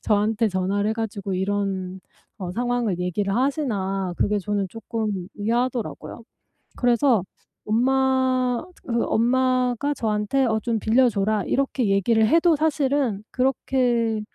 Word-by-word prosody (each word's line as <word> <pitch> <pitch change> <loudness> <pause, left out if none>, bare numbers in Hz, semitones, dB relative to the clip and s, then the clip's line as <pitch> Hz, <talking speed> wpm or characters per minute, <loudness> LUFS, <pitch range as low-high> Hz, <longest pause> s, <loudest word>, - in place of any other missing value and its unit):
저한테 215 +1 +1
전화를 195 +2 0
해 - - +1
가지고 205 -4 -4
이런 190 -1 -2 0.4
어 185 -3 -5
상황을 240 -3 -1
얘기를 190 +3 -1
하시나.' 200 - -1
그게 210 0 +1
저는 200 0 -2
쪼끔 215 -4 -4
의아하더라고요. 235 +2 -2 0.6
그래서 245 -3 +3 0.4
엄마 255 +1 +1 0.2
그 235 -3 0
엄마가 255 +3 +1
저한테 215 +4 0
"어 220 -2 +1
좀 230 -1 -1
빌려 245 +4 +3
줘라." 205 -1 0
이렇게 265 -4 0
얘기를 220 +3 +3
해도 330 +5 +4
사실은 280 -8 0
그렇게 245 -4 0
225 Hz, 280 characters per minute, -23 LUFS, 205-255 Hz, 0.6 s, 해도